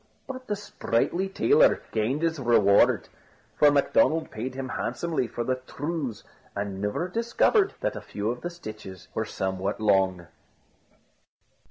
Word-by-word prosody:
But 255 -1 -8
the 210 - 0
sprightly 190 - -1
tailor 445 - +4
gained 120 +8 0
his 165 -2 0
reward: 115 -5 +4 0.5
for 150 - +6
Macdonald 145 +3 +2
paid 125 +4 -5
him 135 -1 -4
handsomely 130 +3 -2
for 120 - -4
the 130 +1 0
trews, 145 -7 -4 0.3
and 100 -1 -4
never 105 +12 -1
discovered 235 - +2
that - - -1
a - - -5
few 105 +2 -3
of 120 - -6
the 175 - -3
stitches 110 - -10
were - - -1
somewhat 95 +2 -3
long. 95 -4 +2
130 Hz, 140 wpm, -26 LUFS, 105-170 Hz, 0.5 s, for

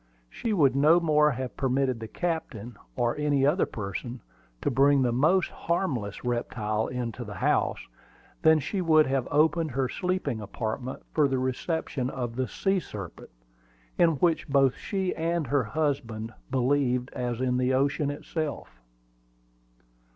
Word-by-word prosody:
She 230 - -3
would 145 -10 +3
no 155 +5 +5
more 150 -3 +4
have 130 -2 -4
permitted 130 -2 0
the 110 - -6
captain, 130 - -4 0.2
or 120 -2 +1
any 145 -2 +2
other 150 +7 +2
person, 115 +4 -6 0.4
to - - +1
bring 140 0 +4
the 120 - +2
most 155 +10 +2
harmless 130 - -2
reptile 110 -3 -1
into 125 -1 -4
the 105 -3 -8
house, - - +1 0.6
than 160 0 +6
she 185 +6 -2
would 155 -3 +5
have 135 -2 -1
opened 160 +2 +2
her 135 0 0
sleeping 180 - -2
apartment 110 +5 -5
for 150 -2 +4
the 135 -1 0
reception 130 +1 -2
of 120 -3 -4
the 130 0 -1
sea 195 -1 0
serpent, 100 - -9 0.7
in 170 -1 +4
which 165 +1 +1
both 135 -2 +4
she 190 -3 -2
and 165 0 -1
her 140 -1 +1
husband 120 -5 -2 0.2
believed 125 -1 +1
as 120 -1 -3
in 125 -1 +1
the 125 0 +1
ocean 140 +2 +1
itself. 145 - -5
135 Hz, 145 wpm, -27 LUFS, 120-155 Hz, 0.7 s, than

